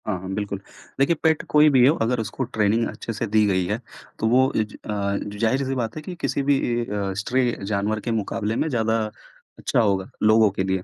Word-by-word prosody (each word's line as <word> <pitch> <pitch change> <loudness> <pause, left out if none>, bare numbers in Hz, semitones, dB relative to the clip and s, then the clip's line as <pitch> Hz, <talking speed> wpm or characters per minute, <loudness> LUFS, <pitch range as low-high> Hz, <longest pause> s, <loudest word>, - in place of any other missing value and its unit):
हाँ, 100 -3 -1
हाँ 95 +1 -8
बिल्कुल। 100 -1 -3 0.4
देखिए 140 +5 +3
पेट 160 -1 +3
कोई 150 0 +6
भी 130 -3 +5
हो 150 - +4
अगर 120 +2 +1
उसको 115 +4 -3
ट्रेनिंग 115 -1 +1
अच्छे 115 - -6
से 115 +2 -2
दी 105 +1 +3
गई 95 -2 +1
है 105 +5 -1 0.4
तो 110 - +1
वो 130 +3 +4
इज 110 -1 -1
अ, - - -10 0.3
जो 105 0 -6
ज़ाहिर-सी 130 +4 +1
बात 115 -3 -3
है 155 - -5
कि 180 +4 -7
किसी 135 +1 0
भी 140 0 +3 0.2
ए 120 0 -1
अ, 100 -3 -3
स्ट्रे 125 +4 +1
जानवर 105 +1 -1
के 120 - -1
मुकाबले 110 0 -2
में 155 - 0
ज़्यादा 115 -3 +1 0.6
अच्छा - - 0
होगा 100 -4 +1
लोगों 110 0 +5
के 95 - -2
लिए। 95 -1 -1
110 Hz, 220 wpm, -23 LUFS, 105-130 Hz, 0.6 s, कोई